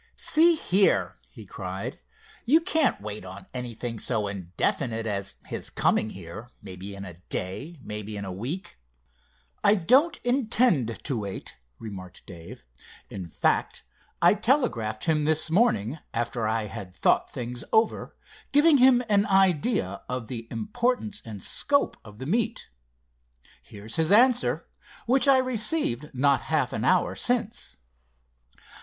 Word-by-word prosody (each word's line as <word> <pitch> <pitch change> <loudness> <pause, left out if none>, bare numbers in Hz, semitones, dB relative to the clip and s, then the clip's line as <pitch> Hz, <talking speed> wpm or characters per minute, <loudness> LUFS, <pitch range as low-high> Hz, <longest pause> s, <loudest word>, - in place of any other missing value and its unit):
"See 335 +2 +5
here!" 195 - +2
he - - -12
cried, - - -6 0.4
"you 290 +7 +5
can't 320 -5 +2
wait 105 -1 -6
on 95 0 -10
anything 120 -2 -4
so 110 -3 +1
indefinite 100 - -1
as 100 -2 -1
his - - -5
coming 110 - +1
here, 95 +6 -9
maybe 95 0 -8
in 100 0 -7
a 90 - -7 0.2
day; 135 - -3
maybe 105 0 -5
in 100 - -5
a 95 - -5
week." 120 - -6 0.8
"I 205 - +6
don't 265 - +3
intend 230 - +1
to 130 -6 -1
wait," 100 -2 -7 0.2
remarked 95 -5 -10
Dave. 90 - -11 0.5
"In 95 -3 -6
fact, 80 - 0 0.4
I 175 - +7
telegraphed 210 - 0
him 155 -3 +1
this 155 +1 +1
morning, 160 - +2 0.2
after 115 -1 -1
I 110 0 0
had 100 -3 -8
thought - - +2
things 120 0 -5
over, 220 0 +1 0.4
giving 290 0 +5
him 250 -1 +6
an 205 -1 +3
idea 190 - +2
of 125 -3 -4
the 115 -2 -6
importance 220 - -2
and 105 -4 -9
scope 285 0 +1
of 105 -1 -13
the 130 - -7
meet. 225 - -1 0.9
Here's 105 +2 -7
his 160 +2 +1
answer, 205 - +4 0.4
which 265 +4 +2
I 270 -1 +7
received 240 - 0
not 135 0 +2
half 150 -6 0
an 110 - -2
hour 185 -1 +2
since." 240 - -1
130 Hz, 135 wpm, -26 LUFS, -, 0.9 s, I